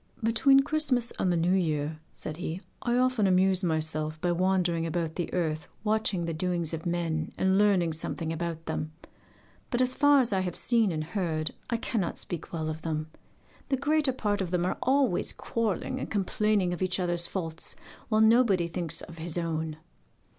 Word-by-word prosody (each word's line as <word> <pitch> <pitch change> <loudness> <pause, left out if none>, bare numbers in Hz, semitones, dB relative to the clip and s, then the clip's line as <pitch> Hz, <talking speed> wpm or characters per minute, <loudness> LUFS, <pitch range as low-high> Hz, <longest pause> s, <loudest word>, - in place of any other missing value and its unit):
'Between 270 +5 +5
Christmas 275 -5 +1
and 185 - +2
the 175 - +2
New 170 +2 +2
Year,' 155 -4 0
said 155 0 -6
he, 170 +1 -4 0.2
'I 240 0 +1
often 255 -5 +3
amuse 185 0 +3
myself 155 -2 -1
by 175 +1 +1
wandering 180 -1 +1
about 165 -1 -2
the 175 - -3
earth 155 -4 -1 0.2
watching 215 -5 +1
the 165 - -2
doings 170 -1 -2
of 165 +1 -4
men 165 -2 -1
and 190 +1 +3
learning 190 -6 +3
something 160 0 -4
about 165 0 -4
them. 155 0 -3 0.8
But 240 - 0
as 255 0 +2
far 290 0 +5
as 240 -5 +1
I 190 - +2
have 180 -2 -2
seen 230 -5 +2
and 155 -2 -2
heard 165 -3 -2 0.2
I 235 - +1
cannot 220 -6 -2
speak 175 - -4
well 160 -2 -3
of 155 0 -4
them. 155 -1 -3 0.6
The 270 - +2
greater 295 +1 +2
part 210 -5 -1
of 185 - -2
them 175 0 0
are 185 - -2
always 260 -6 +2
quarrelling 230 +3 -2
and - - -4
complaining 205 -2 +1
of 175 - -6
each 185 0 0
other's 175 -1 0
faults, 165 -4 -4 0.3
while 215 -1 +3
nobody 220 -6 +5
thinks 170 -1 -2
of 170 -1 -10
his 165 +1 -4
own. 160 -2 -2
180 Hz, 180 wpm, -28 LUFS, 165-220 Hz, 0.8 s, Between